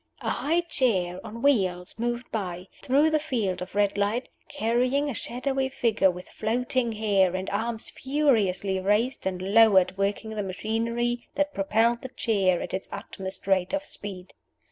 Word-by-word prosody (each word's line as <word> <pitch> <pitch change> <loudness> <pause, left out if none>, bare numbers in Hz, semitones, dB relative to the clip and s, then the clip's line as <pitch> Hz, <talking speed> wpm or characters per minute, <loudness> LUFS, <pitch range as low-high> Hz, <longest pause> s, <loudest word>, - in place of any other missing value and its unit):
A - - -1
high 330 +4 +1
chair 200 - 0
on 230 +2 -8
wheels 185 -10 +2
moved 240 +1 -2
by, 185 -4 -4
through 285 +4 +3
the 310 - +3
field 230 -12 -2
of 180 +2 -7
red 205 0 +2
light, 215 +5 0 0.2
carrying 250 +6 +1
a - - -4
shadowy 265 +3 -2
figure 225 -7 +2
with 180 0 -6
floating 240 +2 -1
hair, 200 -4 +2
and 185 +1 -3
arms 225 +2 -2
furiously 220 -10 +1
raised 210 +5 +1
and 185 -1 -2
lowered 195 -1 +5
working 205 +3 -1
the 215 -1 -2
machinery 230 +5 -2
that 290 0 0
propelled 225 +4 +2
the 260 - -6
chair 195 -8 +1
at - - -7
its 190 - -4
utmost 190 0 -6
rate 190 +2 +1
of 290 0 -3
speed. 190 -7 -8
220 Hz, 160 wpm, -26 LUFS, 190-250 Hz, 0.2 s, lowered